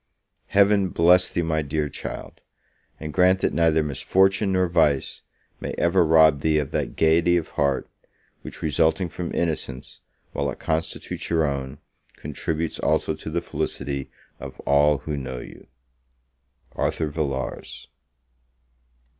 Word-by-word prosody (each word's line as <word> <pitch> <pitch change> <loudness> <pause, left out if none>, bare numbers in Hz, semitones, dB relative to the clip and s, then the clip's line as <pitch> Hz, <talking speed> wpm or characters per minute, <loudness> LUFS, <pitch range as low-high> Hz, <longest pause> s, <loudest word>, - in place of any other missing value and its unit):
Heaven 100 -1 +3
bless 90 +2 +4
thee, 85 - -1
my 80 -1 0
dear 75 +1 -2
child! - - -8 0.6
And 75 -1 -6
grant 95 +1 +4
that - - +1
neither 80 -2 +3
misfortune 95 +7 +1
nor 95 -1 +2
vice 80 -6 +1 0.4
may - - -5
ever 85 +1 +3
rob 80 -2 +5
thee 80 0 +2
of 75 -3 -2
that - - -2
gaiety 85 +2 +3
of 80 - -3
heart, 70 -3 0 0.5
which, - - -9
resulting 80 +4 +1
from 85 +1 -5
innocence, 75 -6 -3 0.3
while - - -1
it - - -6
constitutes 80 0 -3
your 80 -2 +2
own, 70 -1 -3 0.4
contributes 75 +2 -3
also - - +1
to 80 +1 -8
the 85 +2 -1
felicity 70 -5 -4 0.3
of - - -9
all 75 +1 +3
who 75 +1 -5
know 65 -2 -5
you! - - -11 1.0
ARTHUR 80 -2 -1
VILLARS. 70 -4 -4
80 Hz, 135 wpm, -24 LUFS, 70-85 Hz, 1.0 s, rob